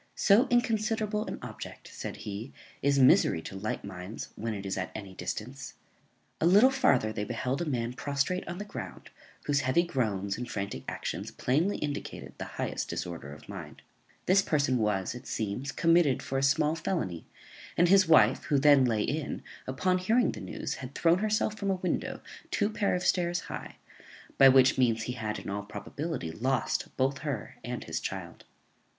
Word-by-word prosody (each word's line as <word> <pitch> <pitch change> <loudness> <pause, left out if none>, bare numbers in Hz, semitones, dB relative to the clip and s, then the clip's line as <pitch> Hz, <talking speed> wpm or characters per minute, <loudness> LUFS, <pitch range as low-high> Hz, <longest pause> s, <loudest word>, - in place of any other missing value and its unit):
So 215 +7 +5
inconsiderable 220 -3 +1
an - - -4
object, - - -8
said - - -5
he, 105 +5 -5 0.3
is 140 0 +3
misery 130 -10 +5
to - - -7
light 100 +2 -3
minds, 95 +2 -7
when 110 0 -3
it 100 -1 -6
is 95 - -2
at 95 - -3
any 100 -3 -7
distance. 130 +8 -6 0.6
A 165 - +3
little 210 +9 +7
farther 125 - +3
they 105 - -2
beheld 125 +6 -2
a - - 0
man 120 -3 -1
prostrate 145 +7 -1
on 175 +1 -5
the 205 - -5
ground, 205 - -8 0.3
whose 145 -1 +2
heavy 135 +5 +3
groans 105 - -1
and 125 0 -5
frantic 100 -12 -4
actions - - -4
plainly 160 +11 +1
indicated 145 -1 -5
the - - -3
highest - - -2
disorder 85 -5 -5
of 75 - -12
mind. - - -9 0.4
This 190 +2 +5
person 140 -7 +1
was, 105 -3 0
it 125 - -10
seems, 110 +6 -3
committed 165 -5 +3
for 135 - -1
a - - -1
small 145 +3 +3
felony; 155 - -3 0.5
and 175 - +5
his 190 0 +6
wife, 130 -7 +5
who 145 -1 +2
then 140 -1 +6
lay 110 -4 +1
in, 155 0 -3 0.2
upon 185 +8 +1
hearing 225 +7 +3
the - - -8
news, - - -4
had 130 +1 -8
thrown 170 +2 +3
herself 215 0 +1
from 200 -1 -1
a 190 - +2
window 185 -1 -2 0.3
two 205 0 +1
pair 205 -3 +1
of 180 - -2
stairs 175 -1 +1
high, - - -7 0.6
by 135 - +10
which 130 0 +5
means 115 -3 +3
he 125 - -3
had, 110 -3 -3
in - - -8
all 100 +1 -2
probability, 125 - -5
lost 130 +9 0
both 135 +1 +1
her 140 -7 -4
and - - -4
his - - -3
child. - - -6
135 Hz, 180 wpm, -29 LUFS, 110-175 Hz, 0.6 s, by